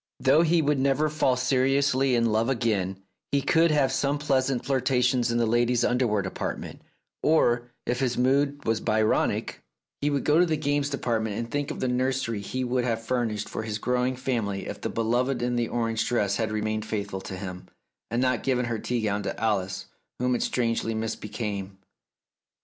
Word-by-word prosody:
Though 160 Hz, -, +5 dB
he 170 Hz, -1 st, +3 dB
would 145 Hz, -1 st, +2 dB
never 140 Hz, +3 st, +2 dB
fall 150 Hz, -4 st, +2 dB
seriously 130 Hz, +1 st, +2 dB
in 115 Hz, -1 st, +2 dB
love 110 Hz, +3 st, +1 dB
again, 100 Hz, -6 st, -1 dB, 0.3 s
he 140 Hz, -, +3 dB
could 165 Hz, +4 st, +4 dB
have 145 Hz, -4 st, +2 dB
some 140 Hz, +2 st, 0 dB
pleasant 135 Hz, -3 st, 0 dB
flirtations 125 Hz, -2 st, +2 dB
in 120 Hz, -, +1 dB
the 120 Hz, -, +2 dB
ladies' 120 Hz, +1 st, +2 dB
underwear 120 Hz, -5 st, +1 dB
department, 95 Hz, -, -5 dB, 0.4 s
or, 120 Hz, -6 st, +2 dB, 0.2 s
if 125 Hz, 0 st, -1 dB
his 130 Hz, -2 st, 0 dB
mood 140 Hz, +3 st, +1 dB
was 110 Hz, -1 st, +1 dB
Byronic, 110 Hz, -1 st, +1 dB, 0.4 s
he 145 Hz, -, +2 dB
would 140 Hz, -2 st, 0 dB
go 150 Hz, +2 st, +4 dB
to 180 Hz, -, +6 dB
the 155 Hz, -1 st, 0 dB
games 145 Hz, -1 st, 0 dB
department 110 Hz, -6 st, -1 dB
and 115 Hz, 0 st, -4 dB
think 145 Hz, -1 st, -1 dB
of -, -, -5 dB
the 130 Hz, -, +1 dB
nursery 125 Hz, -3 st, 0 dB
he 130 Hz, +5 st, -3 dB
would 125 Hz, 0 st, 0 dB
have 115 Hz, -2 st, -2 dB
furnished 115 Hz, -4 st, -1 dB
for -, -, -4 dB
his 110 Hz, -1 st, -3 dB
growing 125 Hz, +3 st, 0 dB
family 115 Hz, -7 st, -2 dB
if -, -, -7 dB
the -, -, -2 dB
beloved 120 Hz, +3 st, 0 dB
in 120 Hz, 0 st, 0 dB
the 120 Hz, -1 st, 0 dB
orange 115 Hz, -2 st, -1 dB
dress 105 Hz, -4 st, +1 dB
had 110 Hz, -2 st, -1 dB
remained 110 Hz, 0 st, -1 dB
faithful 100 Hz, -3 st, -3 dB
to 95 Hz, -, -7 dB
him, 90 Hz, -1 st, -7 dB, 0.4 s
and 120 Hz, +2 st, 0 dB
not 125 Hz, -2 st, +1 dB
given 125 Hz, -2 st, +1 dB
her 115 Hz, -2 st, -2 dB
tea 120 Hz, +1 st, -2 dB
gown 105 Hz, -1 st, 0 dB
to 100 Hz, -, -4 dB
Alice, 95 Hz, -4 st, -1 dB, 0.3 s
whom 125 Hz, 0 st, +1 dB
it 120 Hz, -, 0 dB
strangely 115 Hz, -2 st, 0 dB
misbecame. 105 Hz, -3 st, -4 dB
120 Hz, 185 wpm, -26 LUFS, 110-135 Hz, 0.4 s, to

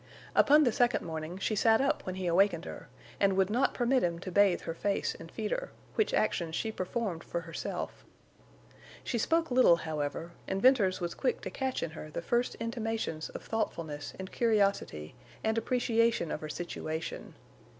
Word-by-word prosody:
Upon 300 Hz, +2 st, +6 dB
the 245 Hz, -, +3 dB
second 245 Hz, +2 st, +2 dB
morning 160 Hz, +1 st, -5 dB
she 215 Hz, +3 st, -1 dB
sat 220 Hz, +2 st, +4 dB
up 275 Hz, -6 st, 0 dB
when 185 Hz, -, -2 dB
he 190 Hz, -1 st, -4 dB
awakened 175 Hz, 0 st, +3 dB
her, -, -, -8 dB, 0.3 s
and 195 Hz, -1 st, +3 dB
would 190 Hz, +1 st, +3 dB
not 245 Hz, +5 st, +2 dB
permit 250 Hz, +1 st, +2 dB
him 170 Hz, -1 st, 0 dB
to 185 Hz, -, -5 dB
bathe 195 Hz, -1 st, +4 dB
her 165 Hz, -, -4 dB
face 200 Hz, +4 st, -1 dB
and -, -, -11 dB
feed -, -, -3 dB
her, -, -, -2 dB, 0.2 s
which 435 Hz, -, +1 dB
actions 170 Hz, -6 st, 0 dB
she 220 Hz, -, -1 dB
performed 185 Hz, -3 st, -3 dB
for 170 Hz, -, -3 dB
herself. 165 Hz, 0 st, -5 dB, 1.0 s
She 235 Hz, -, -1 dB
spoke 330 Hz, +5 st, +1 dB
little, 250 Hz, -8 st, +6 dB
however, 160 Hz, 0 st, -3 dB, 0.2 s
and 190 Hz, -, -1 dB
Venters 205 Hz, -7 st, +4 dB
was 175 Hz, -1 st, -2 dB
quick 255 Hz, -3 st, -1 dB
to -, -, -5 dB
catch 265 Hz, -1 st, -2 dB
in 160 Hz, -, -3 dB
her 155 Hz, -1 st, -8 dB
the 170 Hz, -, -5 dB
first 240 Hz, +6 st, +1 dB
intimations 225 Hz, -8 st, -3 dB
of -, -, -8 dB
thoughtfulness 160 Hz, -9 st, -3 dB
and 190 Hz, 0 st, -7 dB
curiosity 200 Hz, -, +1 dB, 0.3 s
and 220 Hz, 0 st, +1 dB
appreciation 230 Hz, -5 st, +1 dB
of -, -, -3 dB
her 155 Hz, -, -5 dB
situation. 160 Hz, -1 st, -5 dB
195 Hz, 180 wpm, -31 LUFS, 170-235 Hz, 1.0 s, Upon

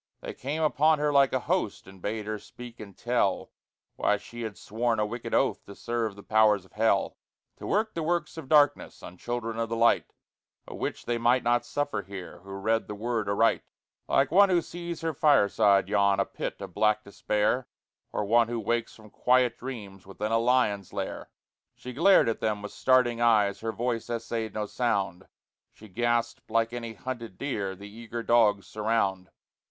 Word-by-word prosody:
They -, -, -6 dB
came 150 Hz, +5 st, -3 dB
upon 155 Hz, +1 st, +3 dB
her 150 Hz, 0 st, 0 dB
like 140 Hz, -1 st, +5 dB
a 130 Hz, -, 0 dB
host, 175 Hz, -, -1 dB
And 95 Hz, -1 st, -15 dB
bade 105 Hz, +2 st, -3 dB
her 110 Hz, 0 st, -4 dB
speak 120 Hz, +1 st, -12 dB
and 100 Hz, -3 st, -11 dB
tell 120 Hz, -6 st, 0 dB, 0.5 s
Why 105 Hz, -, +2 dB
she 120 Hz, +3 st, -10 dB
had 110 Hz, -4 st, -5 dB
sworn 115 Hz, +3 st, -1 dB
a 105 Hz, -, +2 dB
wicked 120 Hz, +3 st, -6 dB
oath -, -, +1 dB
To 100 Hz, -, -10 dB
serve 115 Hz, -3 st, -2 dB
the 100 Hz, -, -12 dB
powers 105 Hz, -3 st, +3 dB
of -, -, -22 dB
hell; 105 Hz, -3 st, +1 dB, 0.4 s
To -, -, -8 dB
work 215 Hz, +1 st, 0 dB
the 165 Hz, -, -3 dB
works 170 Hz, +2 st, -1 dB
of 160 Hz, -5 st, -9 dB
darkness 150 Hz, -2 st, +3 dB
On 90 Hz, -, -9 dB
children 115 Hz, +2 st, -4 dB
of 115 Hz, -1 st, -1 dB
the 115 Hz, -, -2 dB
light, 115 Hz, +1 st, +3 dB, 0.6 s
A -, -, -8 dB
witch -, -, -4 dB
they 120 Hz, 0 st, -1 dB
might 120 Hz, +2 st, +3 dB
not 120 Hz, 0 st, +1 dB
suffer 145 Hz, -7 st, -2 dB
here 95 Hz, -3 st, -9 dB
Who 100 Hz, -, -16 dB
read 110 Hz, +4 st, -1 dB
the 105 Hz, -, -6 dB
Word 110 Hz, -1 st, -2 dB
aright. 110 Hz, +3 st, +2 dB, 0.5 s
Like 135 Hz, +1 st, +2 dB
one 200 Hz, +3 st, +6 dB
who 175 Hz, -2 st, +2 dB
sees 170 Hz, -1 st, -6 dB
her 165 Hz, -1 st, -1 dB
fireside 105 Hz, -9 st, +4 dB
yawn, 100 Hz, -1 st, +2 dB
A 100 Hz, -, +2 dB
pit -, -, -6 dB
of -, -, -7 dB
black 110 Hz, 0 st, +2 dB
despair, 105 Hz, +5 st, -1 dB, 0.4 s
Or 105 Hz, -, -2 dB
one 115 Hz, +2 st, +4 dB
who 120 Hz, 0 st, -3 dB
wakes 120 Hz, 0 st, -2 dB
from 110 Hz, -2 st, -16 dB
quiet 125 Hz, -1 st, +2 dB
dreams 100 Hz, -7 st, -8 dB
Within 105 Hz, +3 st, -4 dB
a 115 Hz, -, +3 dB
lion's 115 Hz, -5 st, +1 dB
lair, -, -, -5 dB, 0.5 s
She 125 Hz, -, -9 dB
glared 185 Hz, +5 st, +5 dB
at 115 Hz, -, -1 dB
them 105 Hz, -2 st, -1 dB
with 105 Hz, -, -6 dB
starting 125 Hz, -2 st, +2 dB
eyes, 105 Hz, -4 st, +3 dB
Her 115 Hz, 0 st, -3 dB
voice 120 Hz, 0 st, -3 dB
essayed 115 Hz, -1 st, -3 dB
no 105 Hz, -1 st, -1 dB
sound; 100 Hz, -5 st, -1 dB, 0.4 s
She 110 Hz, -, -15 dB
gasped 120 Hz, +3 st, -1 dB
like 115 Hz, +1 st, +1 dB
any 115 Hz, -2 st, -5 dB
hunted 115 Hz, -6 st, -6 dB
deer 105 Hz, -9 st, -3 dB
The 100 Hz, +2 st, -11 dB
eager 115 Hz, +2 st, -7 dB
dogs 110 Hz, -5 st, +3 dB
surround. 105 Hz, -4 st, -1 dB
115 Hz, 190 wpm, -27 LUFS, 105-125 Hz, 0.6 s, one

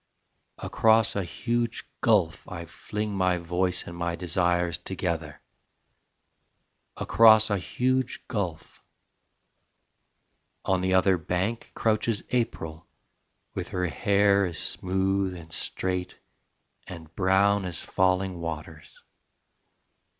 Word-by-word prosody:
Across 115 Hz, -2 st, +3 dB
a 100 Hz, -, 0 dB
huge 120 Hz, +5 st, -2 dB, 0.2 s
gulf 100 Hz, -8 st, +2 dB
I 85 Hz, -2 st, -6 dB
fling 105 Hz, +5 st, -5 dB
my 90 Hz, -2 st, +2 dB
voice 90 Hz, +1 st, -1 dB
And 85 Hz, -, -8 dB
my 85 Hz, 0 st, -2 dB
desires 90 Hz, -1 st, 0 dB
together: 80 Hz, -4 st, -4 dB, 1.6 s
Across 110 Hz, -1 st, +6 dB
a 100 Hz, -, +1 dB
huge 130 Hz, +6 st, -1 dB
gulf... 95 Hz, -8 st, -4 dB, 1.8 s
on 95 Hz, -1 st, +1 dB
the 95 Hz, 0 st, +2 dB
other 95 Hz, -1 st, +4 dB
bank 95 Hz, +8 st, -2 dB
Crouches 110 Hz, -1 st, 0 dB
April 85 Hz, -9 st, -2 dB, 0.7 s
with -, -, -4 dB
her 90 Hz, 0 st, -1 dB
hair 100 Hz, +2 st, +3 dB
as 85 Hz, -, -6 dB
smooth 95 Hz, 0 st, 0 dB
and 80 Hz, -2 st, -11 dB
straight 90 Hz, -1 st, -3 dB, 0.7 s
and 80 Hz, -2 st, -10 dB
brown 100 Hz, +1 st, +3 dB
As 90 Hz, -2 st, -3 dB
falling 95 Hz, -1 st, +1 dB
waters. 80 Hz, -2 st, -7 dB
95 Hz, 100 wpm, -27 LUFS, 85-105 Hz, 1.8 s, Across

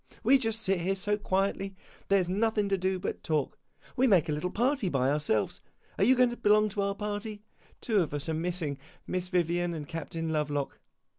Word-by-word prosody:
We 265 Hz, +4 st, +6 dB
just 225 Hz, -2 st, -1 dB
sit 190 Hz, -2 st, +1 dB
here 190 Hz, +3 st, 0 dB
so 205 Hz, +2 st, +1 dB
quietly 195 Hz, -1 st, -1 dB, 0.3 s
there 195 Hz, -1 st, +4 dB
's -, -, -7 dB
nothing 210 Hz, +2 st, +1 dB
to 195 Hz, -, +3 dB
do 190 Hz, +1 st, 0 dB
but 180 Hz, -, -3 dB
to -, -, -12 dB
talk. 155 Hz, -4 st, -1 dB, 0.4 s
We 260 Hz, +1 st, +3 dB
make 190 Hz, -9 st, +4 dB
a -, -, -1 dB
little 150 Hz, +5 st, -1 dB
party 245 Hz, 0 st, +1 dB
by 135 Hz, -3 st, +1 dB
ourselves 145 Hz, -8 st, 0 dB, 0.4 s
are -, -, +4 dB
you 255 Hz, +6 st, +6 dB
going 250 Hz, -1 st, +4 dB
to 240 Hz, -, -6 dB
belong 215 Hz, -1 st, +4 dB
to 205 Hz, 0 st, -2 dB
our 200 Hz, 0 st, 0 dB
party? 210 Hz, 0 st, -4 dB, 0.4 s
Two 220 Hz, -4 st, +2 dB
of 160 Hz, -, -2 dB
us 145 Hz, +2 st, -4 dB
are 160 Hz, -, -1 dB
missing 160 Hz, -3 st, -2 dB, 0.3 s
Miss 180 Hz, 0 st, -2 dB
Vivian 175 Hz, -1 st, 0 dB
and 150 Hz, -2 st, -6 dB
Captain 165 Hz, 0 st, -4 dB
Lovelock. 145 Hz, -2 st, -2 dB
190 Hz, 210 wpm, -29 LUFS, 160-210 Hz, 0.4 s, We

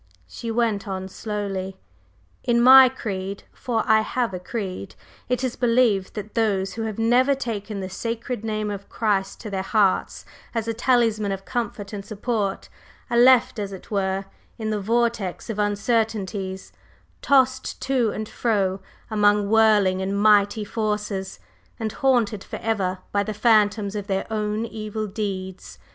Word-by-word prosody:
She 230 Hz, -, -7 dB
went 225 Hz, -3 st, 0 dB
on 190 Hz, -1 st, -4 dB
slowly: 195 Hz, -2 st, -4 dB, 0.7 s
"In 235 Hz, 0 st, +2 dB
my 260 Hz, +1 st, +9 dB
creed 195 Hz, -6 st, -5 dB
for 230 Hz, -3 st, -1 dB
I 220 Hz, 0 st, +5 dB
have 235 Hz, -1 st, -1 dB
a 180 Hz, -, -4 dB
creed 190 Hz, -1 st, -5 dB, 0.3 s
it 250 Hz, +1 st, 0 dB
is 255 Hz, -1 st, -1 dB
believed 230 Hz, -6 st, +2 dB
that 210 Hz, 0 st, -6 dB
those 200 Hz, -4 st, 0 dB
who 225 Hz, -, -5 dB
have 215 Hz, -2 st, -4 dB
never 245 Hz, +5 st, +3 dB
taken 215 Hz, -5 st, -4 dB
the 190 Hz, -, -4 dB
sacred 230 Hz, +4 st, -4 dB
name 215 Hz, -1 st, -2 dB
of 200 Hz, 0 st, -7 dB
Christ 200 Hz, -3 st, -1 dB
to 215 Hz, -, -7 dB
their 190 Hz, -1 st, -1 dB
hearts, 200 Hz, -1 st, +1 dB, 0.3 s
as 230 Hz, -1 st, -1 dB
a 230 Hz, -, 0 dB
talisman 225 Hz, -4 st, +2 dB
of 195 Hz, 0 st, -5 dB
comfort 215 Hz, -4 st, -4 dB
and 200 Hz, -1 st, -5 dB
support, 210 Hz, -1 st, -2 dB, 0.4 s
are 235 Hz, -, +2 dB
left 250 Hz, -1 st, +5 dB
as 200 Hz, -1 st, -3 dB
it 190 Hz, +2 st, -11 dB
were 195 Hz, -1 st, -1 dB, 0.3 s
in 220 Hz, -1 st, -3 dB
the 210 Hz, -1 st, -1 dB
vortex 230 Hz, -2 st, -1 dB
of 210 Hz, -, -5 dB
uncertainties, 205 Hz, -2 st, -1 dB, 0.5 s
tossed 260 Hz, -1 st, +2 dB
to 255 Hz, -4 st, +1 dB
and 215 Hz, +1 st, -4 dB
fro 195 Hz, -6 st, 0 dB, 0.3 s
among 205 Hz, -1 st, +4 dB
many 200 Hz, -, -3 dB
whirling 210 Hz, -4 st, +4 dB
and 195 Hz, +1 st, -1 dB
mighty 210 Hz, 0 st, +4 dB
forces, 210 Hz, -3 st, -3 dB, 0.4 s
and 220 Hz, -2 st, -2 dB
haunted 235 Hz, -7 st, +1 dB
forever 195 Hz, -5 st, -2 dB
by 200 Hz, -, +2 dB
the 215 Hz, +1 st, -4 dB
phantoms 210 Hz, -2 st, +3 dB
of 205 Hz, -1 st, -4 dB
their 195 Hz, -1 st, -1 dB
own 215 Hz, +1 st, -1 dB
evil 215 Hz, -1 st, -4 dB
deeds. 190 Hz, -3 st, -5 dB
215 Hz, 155 wpm, -23 LUFS, 195-230 Hz, 0.7 s, my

